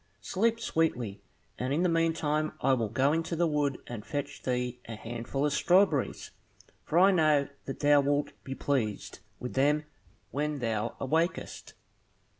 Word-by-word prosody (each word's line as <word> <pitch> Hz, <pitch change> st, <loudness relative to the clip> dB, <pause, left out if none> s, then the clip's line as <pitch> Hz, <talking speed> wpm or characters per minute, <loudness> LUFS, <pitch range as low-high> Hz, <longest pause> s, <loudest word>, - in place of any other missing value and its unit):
Sleep 225 Hz, -, +1 dB
sweetly, 125 Hz, -, -1 dB, 0.4 s
and 130 Hz, +1 st, -2 dB
in 155 Hz, +5 st, +1 dB
the -, -, +4 dB
meantime 160 Hz, -2 st, +1 dB
I 135 Hz, -, +3 dB
will 115 Hz, -4 st, 0 dB
go 135 Hz, +7 st, +2 dB
into 165 Hz, +1 st, -1 dB
the 170 Hz, +1 st, +2 dB
wood, 145 Hz, -4 st, 0 dB
and 115 Hz, -4 st, -7 dB
fetch 145 Hz, +2 st, -4 dB
thee 125 Hz, -1 st, -2 dB
a 115 Hz, -, -5 dB
handful 120 Hz, +5 st, -3 dB
of 145 Hz, -, +1 dB
strawberries, 175 Hz, -7 st, +2 dB, 0.5 s
for 160 Hz, -, -1 dB
I 190 Hz, +3 st, +7 dB
know 155 Hz, -5 st, +3 dB, 0.2 s
that 135 Hz, -, -6 dB
thou 145 Hz, -1 st, +6 dB
wilt 145 Hz, +1 st, 0 dB
be 135 Hz, -, -5 dB
pleased 120 Hz, -9 st, -2 dB, 0.2 s
with 125 Hz, -, -5 dB
them 145 Hz, +3 st, +2 dB, 0.5 s
when 150 Hz, +3 st, -1 dB
thou 115 Hz, -2 st, -2 dB
awakest." 160 Hz, +6 st, -1 dB
145 Hz, 155 wpm, -29 LUFS, 125-160 Hz, 0.5 s, I